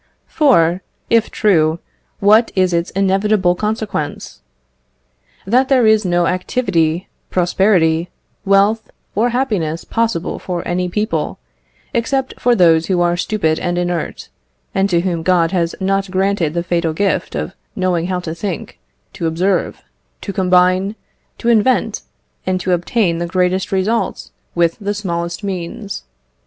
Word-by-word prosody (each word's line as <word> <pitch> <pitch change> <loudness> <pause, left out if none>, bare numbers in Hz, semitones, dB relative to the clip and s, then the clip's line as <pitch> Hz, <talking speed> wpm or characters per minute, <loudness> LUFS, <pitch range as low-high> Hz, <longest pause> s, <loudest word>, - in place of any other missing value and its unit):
For, 185 - +3 0.3
if 230 -1 +3
true, 160 -6 +2 0.4
what 215 +3 +5
is 185 -2 +2
its 170 0 0
inevitable 195 -1 +2
consequence? 210 -5 -4 1.0
That 250 +6 +2
there 255 -4 +4
is 220 -1 +4
no 175 -1 +2
activity, 180 -3 0 0.2
prosperity, 175 -2 +2 0.3
wealth, 200 +3 +2 0.2
or 230 +4 +2
happiness 210 -11 -1
possible 225 -7 -1
for 175 -2 -4
any 180 +1 -1
people, 175 -5 -2 0.6
except 260 +3 0
for 245 0 +3
those 165 -4 +4
who 185 -2 +1
are 175 0 +2
stupid 175 -3 0
and 175 0 -2
inert, 175 -2 -3 0.4
and 195 +1 +1
to 170 -2 +2
whom 175 -2 -1
God 170 -1 +2
has 170 -3 0
not 195 0 0
granted 185 -4 0
the 170 - 0
fatal 170 -2 0
gift 200 +5 -1
of - - -3 0.2
knowing 180 -2 0
how 185 -1 -1
to 160 -2 -5
think, 170 0 -5 0.3
to 165 - -2
observe, 180 +3 -1 0.4
to 200 - -5
combine, 185 +1 +2 0.4
to - - -5
invent, 235 +2 +2 0.5
and 185 0 +1
to 185 - -1
obtain 175 0 +1
the 170 - -2
greatest 185 +2 0
results 200 +4 -1 0.2
with 170 +2 +1
the 205 0 -2
smallest 170 -2 -3
means. 195 +2 -5
185 Hz, 135 wpm, -17 LUFS, 170-205 Hz, 1.0 s, what